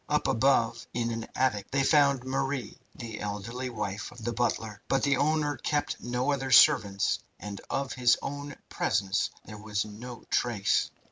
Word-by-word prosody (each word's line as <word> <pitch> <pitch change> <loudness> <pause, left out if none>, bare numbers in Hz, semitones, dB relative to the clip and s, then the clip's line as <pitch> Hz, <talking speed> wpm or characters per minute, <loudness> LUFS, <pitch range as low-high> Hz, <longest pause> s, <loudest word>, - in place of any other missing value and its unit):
Up - - +1
above, 120 -2 +2
in 115 -1 0
an 115 0 -4
attic, 105 -7 0
they 135 0 +1
found 140 -3 +4
Marie, 135 0 -2 0.2
the 115 -2 -7
elderly 105 +5 -4
wife 105 -3 -4
of 120 -2 -12
the 120 +1 -1
butler; 110 -3 -1
but 135 - +1
the 140 -1 +3
owner 150 0 +1
kept 145 +4 -1
no 125 +3 0
other 135 -1 -1
servants, 100 -5 +5 0.2
and 100 -1 -7
of 135 -1 -2
his 125 -2 +4
own 145 +1 -5
presence 95 0 0 0.2
there 105 -1 -9
was 105 -1 -2
no 115 +3 -9
trace. 110 -5 +1
120 Hz, 160 wpm, -29 LUFS, 105-135 Hz, 0.2 s, servants